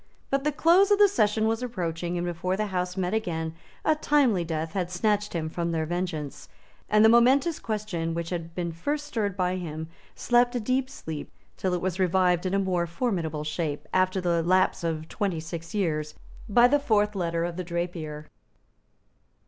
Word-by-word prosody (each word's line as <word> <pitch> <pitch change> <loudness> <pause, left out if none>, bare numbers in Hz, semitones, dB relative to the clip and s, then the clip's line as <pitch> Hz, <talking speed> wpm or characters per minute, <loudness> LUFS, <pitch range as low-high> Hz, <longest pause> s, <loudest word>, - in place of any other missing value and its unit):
But 275 0 +1
the 300 - +1
close 345 +7 +4
of 410 - +5
the 410 0 +7
session 220 - +2
was 225 +1 0
approaching; 175 -7 -3
and 175 - -2
before 175 +2 -2
the 215 - 0
Houses 180 0 -2
met 185 +1 -1
again 160 -7 -2 0.3
a 310 - +5
timely 280 - +2
death 160 -1 -3
had 180 -3 -1
snatched 210 +2 0
him 160 -2 -2
from 170 +1 -2
their 160 -1 -1
vengeance; 170 -4 -4 0.4
and 210 +1 +5
the - - +8
momentous 260 +7 +4
question 195 -7 -3
which 170 0 -4
had 165 -1 -5
been 175 -2 -2
first 290 - -3
stirred 210 -9 -2
by 180 0 0
him 160 -2 -5 0.3
slept 245 0 +2
a - - +1
deep 255 +3 0
sleep 160 - -7 0.3
till 185 -1 -1
it 175 - -3
was 185 0 -2
revived 180 -1 +2
in 185 - 0
a - - +3
more 185 -3 0
formidable 170 - -2
shape, 150 -1 -3
after 185 0 +2
the 170 -2 +1
lapse 185 +1 +2
of 160 -1 -2
twenty 190 -4 -2
six 165 +3 -7
years, 155 -6 -1 0.3
by 240 +4 +6
the 290 +3 +3
fourth 210 -6 +2
letter 170 -3 -1
of 170 -1 -4
The 185 - -3
Drapier. 170 -3 -4
180 Hz, 190 wpm, -27 LUFS, 165-220 Hz, 0.4 s, the